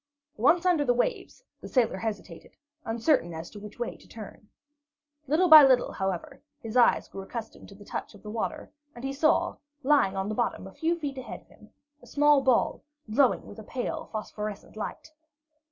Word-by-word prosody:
Once 325 - +3
under 350 -5 +3
the 245 -3 +2
waves, 485 - -2 0.2
the - - -9
sailor 240 -7 +1
hesitated, 200 -5 -6 0.3
uncertain 225 - +1
as 160 +1 -7
to 210 - -10
which 210 0 -11
way 240 -1 -4
to - - -19
turn. 215 -1 -11 0.8
Little 320 +7 +3
by 310 -3 +11
little, 260 -2 +4
however, 190 -3 -4 0.2
his 225 +1 -8
eyes 245 -1 +4
grew 195 - -8
accustomed 220 +3 -8
to 200 - -13
the 205 +1 -14
touch - - -6
of 205 - -17
the 210 - -7
water, 225 0 -4 0.2
and 240 - -10
he 270 0 -2
saw, 315 +4 +2 0.3
lying 270 -9 +3
on 190 +1 -1
the 215 - -2
bottom 235 -4 -2
a 195 - -11
few 335 +1 0
feet 280 -4 -5
ahead 255 - -8
of - - -29
him, - - -19 0.3
a - - -16
small 295 -1 +4
ball 260 -3 +2 0.3
glowing 255 +2 +3
with - - -11
a - - -8
pale 245 +3 -4
phosphorescent 210 -2 -6
light. 220 +8 -6
240 Hz, 190 wpm, -27 LUFS, 210-290 Hz, 0.8 s, by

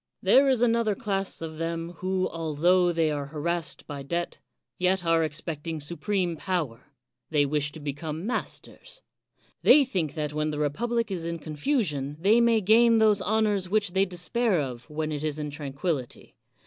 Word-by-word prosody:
There 275 +1 +5
is 250 -3 +3
another 230 -3 +2
class 195 -7 -3
of 160 -1 -7
them, 165 0 -3
who, 185 0 0
altho 170 +3 +2
they 165 -2 +1
are 145 -2 -3
harassed 160 +2 -2
by 145 -1 -6
debt, 170 +5 -3 0.4
yet 185 0 +1
are 165 0 +3
expecting 155 +1 -4
su 150 +4 -3
preme 180 -1 -1
power; 150 -9 -3 0.4
they 150 -2 +3
wish 145 0 -1
to 160 - -8
become 150 +3 -5
masters. - - -5 0.6
They 290 -2 +7
think 180 - -2
that 150 -2 -3
when 150 0 -1
the 150 - -3
republic 230 +10 -1
is 175 -3 -3
in 170 0 -3
confusion 150 - -1
they 210 +7 +4
may 230 -2 +4
gain 230 +3 +5
those 215 -2 +4
honors 205 -2 +1
which 205 -2 +1
they 190 +1 +3
despair 185 +3 0
of 125 -2 -5
when 155 0 -3
it 150 0 -4
is 155 -1 -1
in 150 -1 -4
tranquillity. 145 -1 -4
170 Hz, 170 wpm, -27 LUFS, 150-205 Hz, 0.6 s, They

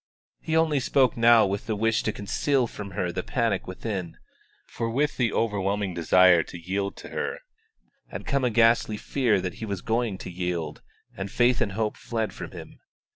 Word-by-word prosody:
He 160 0 0
only 160 -3 +3
spoke 130 -1 +2
now 115 -1 +6
with 100 +1 -3
the 110 - 0
wish 115 +2 +1
to 110 - -1
conceal 125 +6 0
from 105 -3 -7
her 90 -3 0
the - - -3
panic 115 -6 -1
within; 95 -2 -5 0.5
for 115 - -4
with 145 +6 0
the 120 -4 +1
overwhelming 100 -3 -1
desire 85 +1 +5
to 85 - -8
yield 95 +4 -3
to - - -10
her - - -3 0.7
had - - -7
come 140 -3 0
a 125 - +3
ghastly 115 -1 +3
fear 120 -1 +1
that 90 -1 -3
he - - -2
was 100 -3 -3
going 115 -3 0
to 90 - -8
yield, 90 -2 -3 0.3
and 95 0 -5
faith 120 +3 +2
and 100 - 0
hope 110 +1 -2
fled 115 -2 -3
from - - -7
him. - - -11
110 Hz, 185 wpm, -26 LUFS, 95-120 Hz, 0.7 s, now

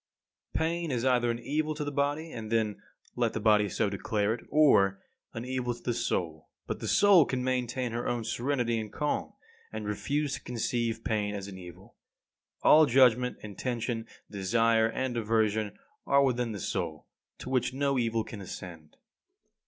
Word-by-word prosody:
28. 160 - +1
Pain 170 0 -2
is 125 -1 -1
either 125 -2 +3
an 115 - 0
evil 150 +5 -2
to 150 - -3
the 145 - -3
body; 145 +3 -1
and 110 -1 -7
then 110 -2 0 0.3
let 120 -2 0
the - - -2
body 105 -1 +4
so 110 - 0
declare 100 +2 0
it; 115 - -7
or 100 -11 +4 0.4
an 115 +2 -4
evil 125 -1 -2
to 120 - -17
the 120 - 0
soul. 80 -8 -2 0.2
But - - -4
the - - -5
soul 200 -5 +6
can 130 -2 -2
maintain 125 -1 -1
her 120 +1 -3
own 120 -1 -1
serenity 120 -1 -1
and 110 -1 -6
calm; 150 -1 -2 0.4
and 110 -1 -5
refuse 140 +8 -1
to - - -4
conceive 115 -1 -2
pain 105 -2 -1
as 100 -1 -5
an 95 -2 -9
evil. 90 -2 -13 0.7
All 155 0 +7
judgment, 125 -1 +4
intention, 115 +2 -3 0.2
desire 110 +3 +2
and 125 +2 -2
aversion 110 -2 0 0.3
are 140 0 +5
within 125 -3 0
the 105 - -5
soul, 85 -6 -3 0.3
to 130 - -7
which 130 -1 +1
no 140 0 0
evil 115 -1 0
can 105 -2 -9
ascend. 85 -4 -9
115 Hz, 175 wpm, -29 LUFS, 105-130 Hz, 0.7 s, All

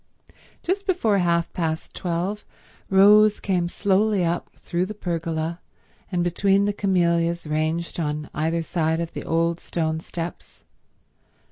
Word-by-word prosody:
Just 395 +3 -1
before 225 - +2
half 170 -1 +1
past 160 -2 -3
twelve 180 +4 -2 0.5
Rose 210 +2 +6
came 180 -3 0
slowly 200 0 +2
up 170 +1 -2
through 175 +1 -2
the 215 - -6
pergola 165 -2 -3 0.5
and 175 -2 +1
between 195 +3 +2
the 205 - 0
camellias 170 -4 +1
ranged 155 +3 -1
on 150 -1 -2
either 165 +2 0
side 160 -1 0
of 170 -1 -4
the - - -5
old 165 +1 0
stone 160 -2 -2
steps. 170 +1 -7
170 Hz, 130 wpm, -24 LUFS, 165-195 Hz, 0.5 s, Rose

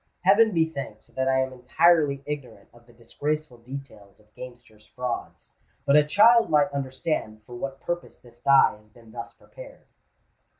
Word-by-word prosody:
Heaven 205 +4 +5
be 165 -3 +2
thanked 140 -9 -9
that 130 0 -1
I 130 0 +2
am 130 0 -6
entirely 140 +2 +2
ignorant 150 -4 -7
of 120 0 -21
the - - -18
disgraceful 135 +3 -5
details 115 -6 -11
of 105 0 -28
gamesters' 120 -4 -13
frauds; 125 +2 -6 0.3
but 140 - +4
a 150 - +7
child 225 +9 +5
might 145 -2 +3
understand 130 -5 -4
for 120 - -13
what 135 +2 -6
purpose 175 0 -5
this 120 -1 -20
die 140 -4 +4
has 105 0 -25
been 115 0 -19
thus 115 0 -8
prepared." - - -14
130 Hz, 165 wpm, -25 LUFS, 120-150 Hz, 0.3 s, a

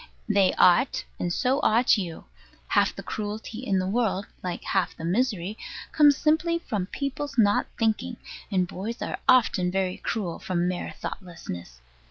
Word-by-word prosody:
They 200 -3 +4
ought; 180 +9 +4 0.2
and 175 - -1
so 255 +8 +1
ought 235 0 +4
you. 180 -6 -4 0.5
Half - - +3
the - - -7
cruelty 215 +1 -5
in 205 -7 0
the 185 - 0
world, 200 -2 0 0.2
like 180 -1 -4
half 180 -4 0
the 165 - -6
misery, 205 0 0 0.3
comes 290 -2 +6
simply 320 +2 +2
from 210 - -3
people's 280 +3 -4
not 205 -3 +4
thinking; 225 +2 0 0.3
and 185 -3 +1
boys 215 +7 -5
are - - -4
often 225 -8 +4
very 185 0 -1
cruel 190 -7 -3
from 175 -1 -1
mere 180 -1 -3
thoughtlessness. 90 - -7
205 Hz, 155 wpm, -26 LUFS, 180-245 Hz, 0.5 s, comes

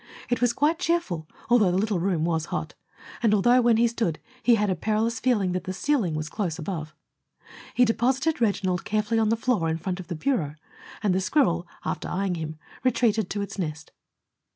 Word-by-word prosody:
It 245 - +1
was 245 -1 +4
quite 305 +6 +1
cheerful, 325 - -1 0.2
although 230 -5 +5
the 180 - +1
little 205 -2 +1
room 170 -3 0
was 160 -2 0
hot, - - -4 0.5
and 215 -3 +4
although, 240 +5 +5
when 235 -2 +4
he 235 +1 +4
stood, 225 -9 -1 0.2
he 240 - +5
had 210 -2 +1
a - - +1
perilous 220 +5 0
feeling 215 -8 +2
that 185 +1 -3
the 185 - -3
ceiling 215 - 0
was 155 0 -3
close 175 -2 -3
above. 160 -3 -5 0.8
He 250 - +5
deposited 260 +6 +1
Reginald 185 -5 +1
carefully 215 +1 0
on 220 -1 +2
the 225 - +2
floor 225 -9 +1
in 160 - 0
front 180 +2 -4
of 180 - -8
the 170 - -4
bureau, 160 - -1 0.5
and 200 -3 +3
the 190 - +1
squirrel, 185 - +2 0.2
after - - -3
eyeing 195 0 -1
him, 160 -2 -5 0.3
retreated 225 -5 +2
to 205 0 -2
its 200 - -7
nest. 160 -2 -4
205 Hz, 200 wpm, -26 LUFS, 175-235 Hz, 0.8 s, although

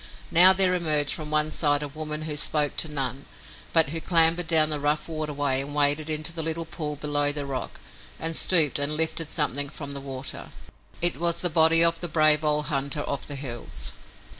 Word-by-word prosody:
Now 180 +2 +8
there 190 -1 +4
emerged 155 -5 +1
from 155 -2 -6
one 155 0 0
side 145 -2 +1
a - - -5
woman 155 +1 -6
who 155 -1 -4
spoke 150 0 +1
to - - +2
none 135 -2 -5 0.4
but 160 -4 +4
who 165 0 -3
clambered 165 0 +3
down 155 -2 +5
the 150 - -2
rough 150 +1 -2
waterway 145 -4 -2
and 145 +1 -6
waded 145 +1 +1
into 155 +2 -1
the 165 - -5
little 165 +1 -2
pool 150 -2 -6
below 145 0 -2
the 145 -1 -5
rock 135 -2 -7 0.4
and 165 0 -3
stooped 155 -6 +5
and 145 +2 -3
lifted 160 0 -2
something 145 -2 -2
from 140 -1 -8
the 140 - -8
water. 135 -1 -6 0.5
It 175 -4 +3
was 170 +1 -1
the 175 - -1
body 165 +1 +4
of 165 0 +1
the 175 - -4
brave 155 -1 +2
old 150 0 0
hunter 140 +1 -2
of 140 -1 -5
the 145 - -5
hills. 120 - -4
150 Hz, 200 wpm, -24 LUFS, 145-160 Hz, 0.5 s, Now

